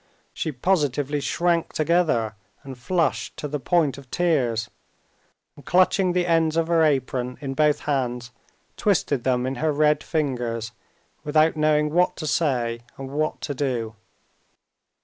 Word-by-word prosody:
She 160 - -3
positively 145 -1 0
shrank 170 +2 0
together 155 -9 +1 0.3
and 135 -1 -8
flushed 165 +8 -1
to 150 - -4
the 150 0 -3
point 150 0 +1
of 135 -2 -15
tears, 125 -11 0 0.9
and 145 - -15
clutching 185 +3 +3
the 180 -1 +1
ends 165 -2 +2
of 165 0 +1
her 165 -1 +3
apron 130 -4 0
in 135 -1 -4
both 150 +1 +2
hands, 125 -4 -2 0.5
twisted 155 - +1
them 125 -1 +1
in 130 0 -3
her 155 -1 +2
red 150 0 +2
fingers 120 -7 -2 0.5
without 155 +2 +3
knowing 150 -1 +2
what 180 +1 +2
to 155 - -5
say 120 -7 0 0.2
and 135 0 -7
what 155 +2 -2
to 145 - -3
do. 125 -5 -2
150 Hz, 145 wpm, -24 LUFS, 125-160 Hz, 0.9 s, clutching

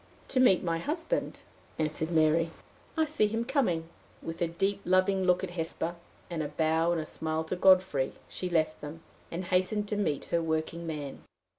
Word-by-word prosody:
"To 260 - +1
meet 250 -8 +5
my 165 -2 0
husband," 330 - -2 0.4
answered 155 0 -1
Mary. 165 0 +3 0.5
"I 320 - +4
see 295 -8 +2
him 225 +2 -1
coming." 230 - +1 0.4
With 165 +2 -6
a 170 - +3
deep, 195 +4 -1
loving 185 +1 +3
look 180 0 +3
at 185 - -3
Hesper, 165 0 -2 0.3
and 170 -2 -3
a 150 - -1
bow 160 +2 +2
and 170 - +1
a 155 - -3
smile 160 0 -2
to 160 +3 -3
Godfrey, 185 -7 +4
she 180 - -4
left 155 -2 +1
them, 155 +3 -8 0.3
and 175 +2 -4
hastened 185 +4 +1
to 210 - 0
meet 195 -9 0
her 170 - +3
working 165 +1 -2
man. 145 -4 -5
170 Hz, 180 wpm, -30 LUFS, 160-190 Hz, 0.5 s, meet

